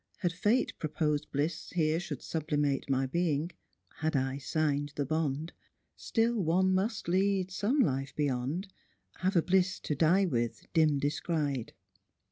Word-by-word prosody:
Had 175 Hz, -3 st, +1 dB
fate 215 Hz, +7 st, +1 dB
Proposed 150 Hz, -1 st, -1 dB
bliss 155 Hz, +3 st, -2 dB
here 160 Hz, -1 st, +2 dB
should 155 Hz, -6 st, -6 dB
sublimate 150 Hz, -3 st, -1 dB
My 135 Hz, 0 st, +2 dB
being 160 Hz, +2 st, 0 dB, 0.2 s
— -, -, -43 dB
had 155 Hz, 0 st, 0 dB
I 135 Hz, 0 st, 0 dB
sign'd 145 Hz, 0 st, 0 dB
the 145 Hz, -, -1 dB
bond 155 Hz, +1 st, -1 dB, 0.2 s
— -, -, -49 dB
Still 230 Hz, -1 st, +1 dB
one 185 Hz, +3 st, +3 dB
must 205 Hz, +2 st, -1 dB
lead 190 Hz, +1 st, +1 dB
some 205 Hz, +9 st, 0 dB
life 135 Hz, -, +1 dB
beyond, 145 Hz, +6 st, -1 dB, 0.5 s
Have 190 Hz, +1 st, 0 dB
a 170 Hz, -, +4 dB
bliss 185 Hz, 0 st, +2 dB
to -, -, -2 dB
die 170 Hz, +7 st, +4 dB
with, 120 Hz, -8 st, -2 dB
dim 155 Hz, -3 st, +4 dB
descried." 145 Hz, -3 st, -1 dB
155 Hz, 150 wpm, -31 LUFS, 145-185 Hz, 0.5 s, a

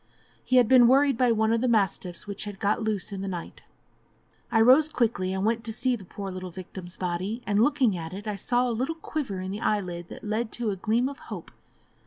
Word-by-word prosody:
He 255 Hz, -, 0 dB
had 250 Hz, -3 st, +6 dB
been 250 Hz, -1 st, +7 dB
worried 275 Hz, +2 st, +4 dB
by 245 Hz, 0 st, +3 dB
one 220 Hz, 0 st, +2 dB
of 230 Hz, -, +1 dB
the 255 Hz, -, +1 dB
mastiffs 195 Hz, -6 st, 0 dB
which 205 Hz, 0 st, -5 dB
had 205 Hz, -1 st, -7 dB
got 205 Hz, +4 st, 0 dB
loose 215 Hz, -2 st, -2 dB
in 195 Hz, -1 st, -5 dB
the 195 Hz, -, -4 dB
night. 175 Hz, -3 st, -6 dB, 0.9 s
I 225 Hz, -, +3 dB
rose 260 Hz, +7 st, +6 dB
quickly 230 Hz, -10 st, 0 dB
and 190 Hz, +1 st, -1 dB
went 230 Hz, +1 st, +1 dB
to 225 Hz, -, -2 dB
see 250 Hz, +3 st, 0 dB
the 210 Hz, -, -10 dB
poor 195 Hz, +1 st, -7 dB
little 185 Hz, 0 st, -6 dB
victim's 180 Hz, 0 st, -8 dB
body, 185 Hz, +6 st, -3 dB
and 205 Hz, 0 st, +2 dB
looking 260 Hz, -5 st, +3 dB
at 165 Hz, -2 st, -6 dB
it, 200 Hz, +3 st, -7 dB
I 210 Hz, -1 st, -2 dB
saw 245 Hz, +5 st, +1 dB
a -, -, 0 dB
little 260 Hz, +8 st, -2 dB
quiver 285 Hz, -, -4 dB
in 185 Hz, 0 st, -4 dB
the 205 Hz, +3 st, -5 dB
eyelid 180 Hz, -6 st, -1 dB
that -, -, -10 dB
led 215 Hz, +1 st, -2 dB
to 235 Hz, -3 st, -1 dB
a -, -, -2 dB
gleam 230 Hz, +6 st, +1 dB
of 280 Hz, 0 st, -7 dB
hope. -, -, -7 dB
215 Hz, 235 wpm, -27 LUFS, 190-245 Hz, 0.9 s, been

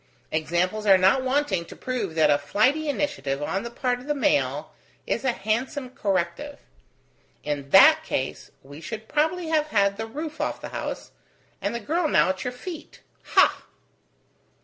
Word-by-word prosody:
Examples 175 Hz, +7 st, -1 dB
are 195 Hz, -1 st, +8 dB
not 190 Hz, +8 st, +4 dB
wanting 260 Hz, -9 st, 0 dB
to -, -, -12 dB
prove 230 Hz, -10 st, -4 dB
that 155 Hz, -2 st, +4 dB
a 145 Hz, -, +3 dB
flighty 255 Hz, -, +1 dB
initiative 285 Hz, -, -2 dB
on 195 Hz, +6 st, -1 dB
the 235 Hz, -, -6 dB
part 245 Hz, +1 st, -1 dB
of 255 Hz, -, -13 dB
the 295 Hz, -, 0 dB
male 145 Hz, -, 0 dB, 0.3 s
is 235 Hz, -, -2 dB
a 260 Hz, -, +2 dB
handsome 240 Hz, +6 st, -2 dB
corrective. 200 Hz, +6 st, -2 dB, 0.9 s
In 145 Hz, -2 st, -4 dB
that 310 Hz, -, +7 dB
case, 135 Hz, -, -3 dB
we 145 Hz, +3 st, -12 dB
should 215 Hz, +6 st, -7 dB
probably 320 Hz, +3 st, 0 dB
have 310 Hz, -1 st, +2 dB
had 200 Hz, -7 st, +2 dB
the 225 Hz, +1 st, -4 dB
roof 305 Hz, +6 st, -6 dB
off -, -, -2 dB
the -, -, -7 dB
house, -, -, -5 dB, 0.5 s
and 200 Hz, +4 st, -2 dB
the -, -, -2 dB
girl 315 Hz, +9 st, 0 dB
now 290 Hz, -, +3 dB
at 185 Hz, 0 st, -2 dB
your 250 Hz, -, -2 dB
feet. 325 Hz, +6 st, -9 dB, 0.3 s
Ha!" -, -, +5 dB
220 Hz, 170 wpm, -25 LUFS, 175-290 Hz, 0.9 s, are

